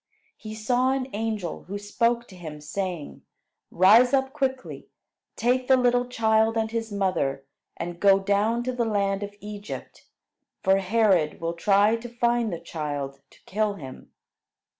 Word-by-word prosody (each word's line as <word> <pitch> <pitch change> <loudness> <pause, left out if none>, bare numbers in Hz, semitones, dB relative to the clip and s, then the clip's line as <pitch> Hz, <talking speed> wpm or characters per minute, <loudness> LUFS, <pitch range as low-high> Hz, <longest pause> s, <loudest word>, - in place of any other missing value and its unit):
He 215 0 -8
saw 245 +4 +1
an 270 -1 -2
angel, 210 -5 -3
who 200 +3 -5
spoke 235 +4 0
to 185 - -13
him, 155 -4 -8
saying: 170 +1 -5 0.5
"Rise 225 +9 +6
up 265 0 0
quickly; 265 -3 -3 0.5
take 250 +2 +1
the 265 - +6
little 245 0 +2
child 220 -1 +2
and 220 0 -1
his 225 -1 -3
mother, 165 -9 -1 0.3
and 175 0 -5
go 195 0 +6
down 205 +4 +1
to 255 - -1
the 245 -1 0
land 200 -3 0
of 205 0 -6
Egypt, 210 0 -8 0.6
for 190 +1 +4
Herod 195 -5 +2
will 165 0 -2
try 200 +5 +3
to 240 +1 -9
find 240 -2 0
the 170 - -4
child 145 -4 -5
to - - -21
kill 210 +1 -1
him." 135 -7 -11
210 Hz, 155 wpm, -25 LUFS, 185-235 Hz, 0.6 s, Rise